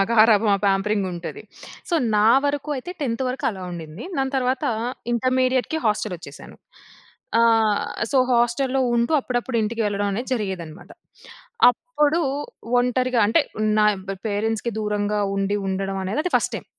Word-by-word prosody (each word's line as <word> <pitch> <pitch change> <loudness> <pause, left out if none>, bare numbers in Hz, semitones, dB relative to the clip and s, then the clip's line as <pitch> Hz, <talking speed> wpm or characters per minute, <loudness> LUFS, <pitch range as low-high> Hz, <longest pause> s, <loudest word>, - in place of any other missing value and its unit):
గారాబం 220 -1 +5
ఆ - - +2
పేంపరింగ్ 195 0 +1
ఉంటది. 180 - -7 0.5
సో, 345 - 0 0.2
నా 210 +1 +4 0.2
వరకు 285 +1 -1
అయితే 260 +8 -6
10త్ 235 -2 -1
వరకు 255 - -4
అలా 190 -3 -8
ఉండింది. 165 +3 -8
దాని 270 0 -1
తర్వాత 255 0 0 0.5
ఇంటర్మీడియేట్‌కి 255 +4 +1
హాస్టల్ 210 -2 0
వచ్చేసాను. 145 -4 -12 0.8
ఆహ్, 225 +1 +3 0.3
సో, 270 - +4
హాస్టల్‌లో 250 +3 +1 0.2
ఉంటూ 235 +6 +1
అప్పుడప్పుడు 245 -1 -2
ఇంటికి 225 +2 -1
వెళ్ళడం 205 0 -1
అనేది 240 +6 -4
జరిగేదిదనమాట. 185 -7 -5 0.8
అప్పుడు 300 +3 0 0.6
ఒంటరిగా 250 0 +1
అంటే 220 - +3 0.4
నాయ్ 210 -1 +4 0.3
పేరెంట్స్‌కి 220 +3 -1
దూరంగా 210 0 -1 0.2
ఉండి 195 +1 0
ఉండడం 195 0 -2
అనేదది 300 - -1
ఫస్ట్ - - -1
టైమ్. - - -8
225 Hz, 130 wpm, -23 LUFS, 205-255 Hz, 0.8 s, గారాబం